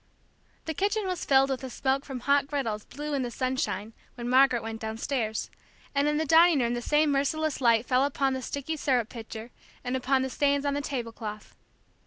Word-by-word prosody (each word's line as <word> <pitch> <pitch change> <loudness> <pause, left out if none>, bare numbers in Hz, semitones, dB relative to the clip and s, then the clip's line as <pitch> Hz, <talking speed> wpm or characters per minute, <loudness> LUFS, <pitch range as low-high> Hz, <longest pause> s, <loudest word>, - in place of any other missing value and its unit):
The 320 - -2
kitchen 405 +6 0
was 365 -2 -3
filled 270 0 +4
with 260 - -1
the 260 - -6
smoke 270 +2 -1
from 260 -3 -6
hot 280 +2 +2
griddles 230 -8 -2
blue 295 +2 -6
in 275 - 0
the 245 - -2
sunshine, 255 -3 -2 0.2
when 240 -1 -5
Margaret 255 -2 +4
went 225 0 -6
downstairs; 220 0 -2 0.4
and 285 +1 +2
in 300 0 +1
the 315 - 0
dining 330 +2 +6
room 240 -1 +1
the 240 - -2
same 295 +3 +2
merciless 285 +2 0
light 230 -1 +4
fell 255 +1 +3
upon 275 -1 +1
the 260 - -3
sticky 285 +5 -4
syrup 250 -6 +1
pitcher, 225 0 -8 0.3
and 250 +1 -2
upon 260 +1 +1
the 265 - -2
stains 285 +1 +1
on 285 - +1
the 285 - -1
tablecloth. 230 -6 -6
265 Hz, 200 wpm, -28 LUFS, 240-285 Hz, 0.4 s, dining